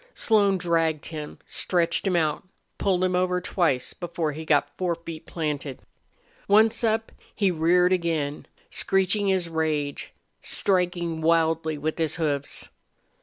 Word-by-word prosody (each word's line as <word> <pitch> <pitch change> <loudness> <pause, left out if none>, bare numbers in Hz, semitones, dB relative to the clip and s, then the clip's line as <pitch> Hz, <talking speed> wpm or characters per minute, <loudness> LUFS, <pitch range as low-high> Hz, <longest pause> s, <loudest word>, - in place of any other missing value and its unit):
Slone 205 -4 +3
dragged 165 -3 0
him, 150 -2 -7
stretched 170 +1 +1
him 185 - +1
out, 155 -3 +1 0.4
pulled 185 -2 +1
him 185 -1 +1
over 180 0 +1
twice 160 -8 0
before 170 -3 -3
he 160 +2 -7
got 145 -1 +2
forefeet 170 -3 -4
planted. 150 -4 -4 0.6
Once 220 +3 +4
up, 225 0 +1 0.2
he 200 -3 +2
reared 180 +2 +3
again, 160 -5 -1 0.2
screeching 195 +1 +1
his 190 -3 +1
rage, 155 -3 -2 0.3
striking 175 -4 0
wildly 160 -1 +2
with 155 +3 -3
his 160 -2 0
hoofs. 145 -4 -2
170 Hz, 125 wpm, -25 LUFS, 155-185 Hz, 0.6 s, Once